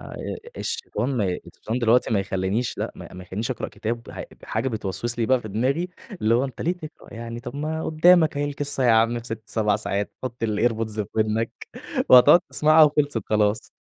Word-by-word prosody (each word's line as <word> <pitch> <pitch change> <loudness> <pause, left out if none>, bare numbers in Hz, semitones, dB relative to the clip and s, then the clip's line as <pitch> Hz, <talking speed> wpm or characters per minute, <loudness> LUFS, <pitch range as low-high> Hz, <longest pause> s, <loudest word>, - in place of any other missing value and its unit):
آآ، - - -10 0.4
الشيطان 300 - -3
ما 105 - +1
ي 90 - -2
الشيطان 115 +3 -5
دلوقتي 120 0 +3
ما 105 -3 +2
يخلّنيش 95 +5 -2
لأ - - -3
ما - - -11
ما 90 - -8
يخلينيش 105 +7 -4
أقرأ 125 - -3
كتاب 115 +1 -5
ه - - -7 0.2
حاجة 115 +4 -1
بتوسوّس 110 +2 -3
لي 115 - +1
بقى 130 -1 +3
في 110 - -8
دماغي، 130 - 0 0.3
اللي 110 +2 +3
هو 125 +3 +2
أنت 130 -3 -7
ليه 175 - +1
تقرأ 155 -8 -11
يعني 115 +1 -6
طَب 120 +3 -8
ما 155 +2 -3
قدّامك 160 -1 +4
أهي 145 - 0
القصّة 145 -1 -2
يا 120 - +5
عم 115 +1 +3
في 115 - -10
6 115 -2 -6
7 105 -1 +1
ساعات، 100 -1 -2
حط 120 -2 -4
الAirPods 110 0 0
في 105 -2 -2
ودنك 110 +1 -1 0.4
وهتقعد 145 +7 +8
تسمعها 155 +1 +5
وخلصت 145 -6 +1
خلاص. 105 0 +1
115 Hz, 200 wpm, -24 LUFS, 110-140 Hz, 0.4 s, وهتقعد